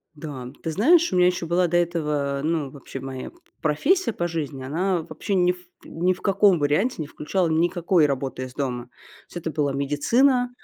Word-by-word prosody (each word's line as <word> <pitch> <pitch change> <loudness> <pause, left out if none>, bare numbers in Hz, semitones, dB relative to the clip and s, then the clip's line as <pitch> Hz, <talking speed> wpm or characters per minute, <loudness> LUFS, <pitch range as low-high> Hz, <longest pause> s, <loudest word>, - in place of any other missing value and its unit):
Да, 140 -5 -7
ты 165 - -2
знаешь, 320 - +4
у 185 - +1
меня 180 0 +6
ещё 180 -1 -1
была 175 +2 +2
до 175 - -2
этого, 150 -5 0
ну, 155 -3 0
вообще 135 -1 -9
моя 130 -1 -6
п 345 - -24 0.2
профессия 255 - +2
по 175 - -1
жизни, 150 -5 -4
она 175 +6 0
вообще 200 +5 -5
ни 180 -1 +4
в 180 - -7 0.3
ни 180 +3 0
в 180 - -13
каком 195 -1 +4
варианте 150 - +1
не 155 - -2
включала 175 +5 -1
никакой 170 +1 +2
работы 135 -1 -3
из 130 -1 -8
дома. 125 -3 -3
То - - -28 0.4
есть - - -9
это 165 -2 -4
была 145 -2 0
медицина, 240 - +2
165 Hz, 200 wpm, -24 LUFS, 145-185 Hz, 0.4 s, меня